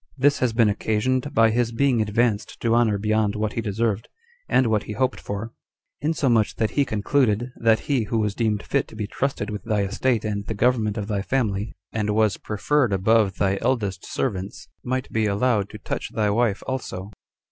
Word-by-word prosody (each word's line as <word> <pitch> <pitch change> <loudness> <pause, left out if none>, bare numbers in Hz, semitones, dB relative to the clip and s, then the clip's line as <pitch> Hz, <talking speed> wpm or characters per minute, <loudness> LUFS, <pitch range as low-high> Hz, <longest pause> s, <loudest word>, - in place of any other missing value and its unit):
This 140 +2 +3
has 125 -2 +2
been 115 -1 +3
occasioned 120 +6 0
by 115 -5 +4
his 120 0 +1
being 125 -1 +2
advanced 110 0 0
to 115 -1 +2
honor 115 -3 +3
beyond 105 0 +1
what 105 0 -1
he 115 - -2
deserved, 110 0 -1 0.4
and 130 - +4
what 110 -2 +2
he 105 - -5
hoped 130 +4 0
for; 100 +3 -5 0.5
insomuch 135 -8 +1
that 110 -2 0
he 140 - +2
concluded, 120 +1 +1
that 115 -1 +3
he 130 -6 0
who 115 +2 -1
was 105 -2 0
deemed 105 -2 0
fit 140 - 0
to - - -13
be 110 -1 -3
trusted 105 -1 -2
with 105 - -5
thy 105 -2 0
estate 110 +3 0
and 100 -1 -3
the 110 - -3
government 110 -2 +1
of 105 -1 -3
thy 105 -2 -1
family, 105 -3 -1 0.2
and 105 -1 -1
was 110 -2 +2
preferred 120 +4 0
above 100 +1 +3
thy 95 -1 +1
eldest 110 -7 -1
servants, 100 -6 -3 0.2
might 130 +1 -2
be 110 -1 +1
allowed 105 0 +1
to - - -9
touch - - -4
thy 105 -2 +1
wife 110 -2 +1
also." 105 -7 -4
110 Hz, 190 wpm, -24 LUFS, 105-120 Hz, 0.5 s, by